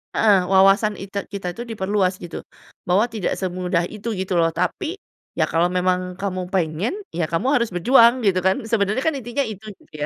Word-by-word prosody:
Heeh, 195 Hz, -4 st, +4 dB
wawasan 195 Hz, +3 st, +4 dB
ite 200 Hz, +1 st, -4 dB
kita 200 Hz, -3 st, -6 dB
tuh 240 Hz, -, -5 dB
diperluas 195 Hz, -3 st, 0 dB
gitu. 170 Hz, -, -6 dB, 0.5 s
Bahwa 190 Hz, +5 st, +3 dB
tidak 215 Hz, -5 st, -2 dB
semudah 180 Hz, -2 st, -1 dB
itu 215 Hz, +1 st, -5 dB
gitu 185 Hz, -2 st, -1 dB
loh, 165 Hz, 0 st, +3 dB
tapi, 320 Hz, -, -2 dB, 0.4 s
"Ya -, -, +2 dB
kalau 165 Hz, +2 st, +3 dB
memang 180 Hz, 0 st, -1 dB
kamu 185 Hz, -2 st, -3 dB
pengen, 175 Hz, -, 0 dB, 0.2 s
ya 170 Hz, -2 st, -2 dB
kamu 165 Hz, +10 st, -1 dB
harus 235 Hz, -1 st, -1 dB
berjuang." 235 Hz, +5 st, +5 dB
Gitu 190 Hz, -3 st, +3 dB
kan, 190 Hz, +3 st, +1 dB
sebenernya 215 Hz, +3 st, +1 dB
kan 320 Hz, -, +1 dB
intinya 240 Hz, +3 st, -2 dB
itu, 215 Hz, -3 st, -7 dB
gitu -, -, -26 dB
195 Hz, 180 wpm, -21 LUFS, 180-220 Hz, 0.5 s, berjuang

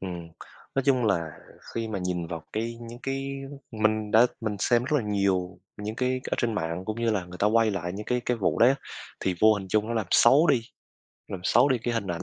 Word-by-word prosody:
Ừm, 85 Hz, -3 st, -6 dB, 0.5 s
nói 135 Hz, -, +1 dB
chung 130 Hz, -3 st, +3 dB
là 85 Hz, -7 st, +1 dB, 0.4 s
khi 115 Hz, -1 st, -2 dB
mà 105 Hz, -3 st, -3 dB
nhìn 90 Hz, -2 st, -2 dB
vào 85 Hz, -1 st, -6 dB
cái 115 Hz, +2 st, -3 dB
những 120 Hz, 0 st, -9 dB
cái 135 Hz, 0 st, -3 dB, 0.4 s
mình 110 Hz, -1 st, 0 dB
đã 115 Hz, +3 st, +6 dB
mình 110 Hz, -3 st, -2 dB
xem 120 Hz, +4 st, +2 dB
rất 145 Hz, -, -4 dB
là -, -, -5 dB
nhiều 95 Hz, -3 st, 0 dB, 0.2 s
những 105 Hz, +2 st, -5 dB
cái 130 Hz, 0 st, 0 dB
ở -, -, +2 dB
trên 115 Hz, -3 st, 0 dB
mạng 85 Hz, -2 st, -2 dB
cũng 110 Hz, +3 st, -4 dB
như 115 Hz, -1 st, +2 dB
là 100 Hz, -4 st, -1 dB
người 90 Hz, 0 st, -11 dB
ta 105 Hz, -, +3 dB
quay 110 Hz, +1 st, +3 dB
lại 90 Hz, -3 st, -3 dB
những 105 Hz, +3 st, -7 dB
cái 125 Hz, 0 st, 0 dB
cái 125 Hz, -, +1 dB
vụ 100 Hz, -, 0 dB
đấy. 125 Hz, +4 st, +6 dB, 0.5 s
Thì 95 Hz, -, 0 dB
vô 110 Hz, 0 st, +6 dB
hình 95 Hz, -2 st, -6 dB
chung 105 Hz, +2 st, +1 dB
nó 115 Hz, -, -2 dB
làm 110 Hz, -4 st, -1 dB
xấu 135 Hz, +8 st, +6 dB
đi 140 Hz, -7 st, +4 dB, 0.7 s
làm 95 Hz, -, -5 dB
xấu 120 Hz, +7 st, +4 dB
đi 130 Hz, -3 st, +2 dB
cái 120 Hz, +1 st, -2 dB
hình 115 Hz, -3 st, -2 dB
ảnh 85 Hz, -2 st, -3 dB
110 Hz, 240 wpm, -27 LUFS, 95-120 Hz, 0.7 s, đã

